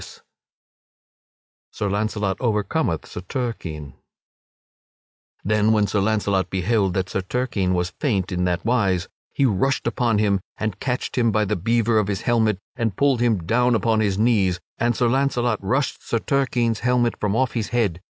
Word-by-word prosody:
[Sidenote: -, -, -12 dB, 1.5 s
Sir 100 Hz, -, -2 dB
Launcelot 105 Hz, -1 st, -1 dB
overcometh 105 Hz, -, 0 dB
Sir -, -, -8 dB
Turquine] 85 Hz, -, -5 dB, 1.5 s
Then 105 Hz, +1 st, +2 dB
when 105 Hz, -1 st, +3 dB
Sir 105 Hz, -, 0 dB
Launcelot 100 Hz, -2 st, +1 dB
beheld 95 Hz, 0 st, 0 dB
that 95 Hz, -1 st, 0 dB
Sir 95 Hz, -, -2 dB
Turquine 95 Hz, -3 st, -1 dB
was 90 Hz, 0 st, -1 dB
faint 100 Hz, -, 0 dB
in 90 Hz, -1 st, -1 dB
that 90 Hz, +1 st, -1 dB
wise, 100 Hz, -7 st, +1 dB, 0.2 s
he 140 Hz, -, +1 dB
rushed 130 Hz, +4 st, +1 dB
upon 120 Hz, -2 st, +1 dB
him 100 Hz, -2 st, +2 dB, 0.2 s
and 110 Hz, -2 st, -3 dB
catched 125 Hz, 0 st, -2 dB
him 115 Hz, -2 st, +3 dB
by 105 Hz, 0 st, +1 dB
the 105 Hz, +2 st, -1 dB
beaver 115 Hz, +3 st, +2 dB
of 105 Hz, -, 0 dB
his 100 Hz, -2 st, -2 dB
helmet 110 Hz, -4 st, +2 dB, 0.2 s
and 115 Hz, -5 st, -2 dB
pulled 140 Hz, -4 st, +2 dB
him 110 Hz, -8 st, +1 dB
down 125 Hz, +5 st, +2 dB
upon 115 Hz, -1 st, +1 dB
his 100 Hz, -3 st, +1 dB
knees. 100 Hz, -6 st, +2 dB, 0.2 s
And 120 Hz, 0 st, +1 dB
Sir 120 Hz, -, +2 dB
Launcelot 125 Hz, -3 st, +1 dB
rushed 130 Hz, +9 st, -1 dB
Sir 115 Hz, -, -1 dB
Turquine's 120 Hz, -3 st, 0 dB
helmet 120 Hz, -1 st, +2 dB
from 105 Hz, 0 st, 0 dB
off 130 Hz, +1 st, +1 dB
his 115 Hz, -3 st, -2 dB
head. 105 Hz, -8 st, 0 dB
110 Hz, 165 wpm, -22 LUFS, 95-120 Hz, 1.5 s, when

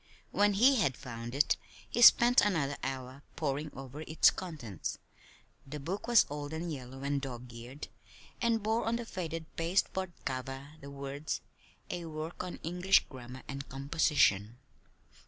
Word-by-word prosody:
When 205 Hz, 0 st, +3 dB
he 255 Hz, +7 st, +6 dB
had 140 Hz, -, +1 dB
found 120 Hz, -2 st, -7 dB
it 145 Hz, -, +3 dB, 0.3 s
he 240 Hz, -, -1 dB
spent 240 Hz, +1 st, +8 dB
another 155 Hz, -9 st, +1 dB
hour 130 Hz, 0 st, -5 dB
poring 150 Hz, 0 st, -1 dB
over 135 Hz, +2 st, -8 dB
its 160 Hz, 0 st, +5 dB
contents. 145 Hz, -, -5 dB, 0.7 s
The 150 Hz, +2 st, -6 dB
book 185 Hz, -, -4 dB
was 240 Hz, -2 st, +6 dB
old 145 Hz, +1 st, -5 dB
and 165 Hz, +1 st, -3 dB
yellow 135 Hz, 0 st, -8 dB
and 140 Hz, 0 st, 0 dB
dog 125 Hz, -3 st, -7 dB
eared, 120 Hz, +5 st, -8 dB, 0.5 s
and 230 Hz, -3 st, +2 dB
bore 220 Hz, +2 st, +1 dB
on 225 Hz, +1 st, +1 dB
the 235 Hz, 0 st, -3 dB
faded 165 Hz, -5 st, -4 dB
pasteboard 185 Hz, +1 st, 0 dB
cover 135 Hz, +1 st, -4 dB
the 140 Hz, -, -9 dB
words: 140 Hz, +2 st, -4 dB, 0.5 s
"A 175 Hz, -1 st, -4 dB
work 155 Hz, +2 st, -5 dB
on 180 Hz, -, -5 dB
English 180 Hz, +4 st, +3 dB
Grammar 130 Hz, 0 st, -9 dB
and 135 Hz, +1 st, -6 dB
Composition." 135 Hz, -6 st, +2 dB
145 Hz, 150 wpm, -32 LUFS, 135-180 Hz, 0.7 s, spent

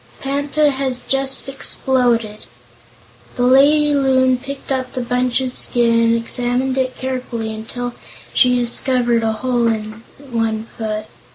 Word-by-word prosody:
"Panta 285 Hz, +2 st, +1 dB
has 265 Hz, -2 st, -3 dB
just 270 Hz, 0 st, 0 dB
exploded." 245 Hz, -, 0 dB, 0.9 s
The 245 Hz, -, -1 dB
lady 290 Hz, +4 st, +5 dB
Loon 260 Hz, -2 st, +3 dB
picked 275 Hz, +1 st, -8 dB
up 260 Hz, -1 st, -2 dB
the 255 Hz, -, -3 dB
bunch 250 Hz, +1 st, 0 dB
of 260 Hz, -1 st, -2 dB
skin 235 Hz, -2 st, +2 dB
and 230 Hz, 0 st, +3 dB
examined 245 Hz, +3 st, 0 dB
it 260 Hz, -1 st, -1 dB
carefully 250 Hz, -4 st, -4 dB
until 240 Hz, +3 st, -5 dB, 0.4 s
she 250 Hz, -1 st, +4 dB
discovered 240 Hz, 0 st, +1 dB
a 225 Hz, -1 st, 0 dB
hole 240 Hz, +1 st, 0 dB
in 215 Hz, -1 st, -3 dB, 0.3 s
one 225 Hz, -2 st, -1 dB
foot. 215 Hz, -1 st, -3 dB
250 Hz, 130 wpm, -18 LUFS, 230-265 Hz, 0.9 s, lady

